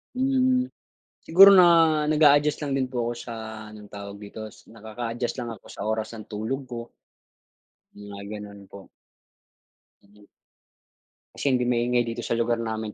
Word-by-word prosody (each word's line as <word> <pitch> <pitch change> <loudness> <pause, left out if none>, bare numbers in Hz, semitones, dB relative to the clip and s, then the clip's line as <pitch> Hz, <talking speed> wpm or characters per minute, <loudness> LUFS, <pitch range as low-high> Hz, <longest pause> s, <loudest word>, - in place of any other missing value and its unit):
Mm. 255 -1 +1 0.6
Siguro 195 +4 +9
na 180 -2 +8 0.4
nag-a-adjust 150 -1 +4
lang 140 - -3
din 130 - 0
po 125 -2 -2
ako - - -2
sa 120 - -8 0.4
anong 105 -1 -13
tawag 100 0 -8
dito, 110 +1 -8 0.2
nakaka-adjust 115 +2 -5
lang 120 - -5
ako 105 - -14
sa - - -8
oras 110 +1 -3
ng 110 - -9
tulog 110 +6 -3
ko, 115 0 -6 1.1
mga 100 -1 -9 0.2
gano'n 100 -1 -11
po. 100 -1 -12 2.5
Kasi - - -7
hindi 125 - 0
maingay 120 0 +1
dito 115 0 -5
sa 115 - -2
lugar 115 0 0
namin 110 -1 -4
115 Hz, 140 wpm, -25 LUFS, 110-140 Hz, 2.5 s, Siguro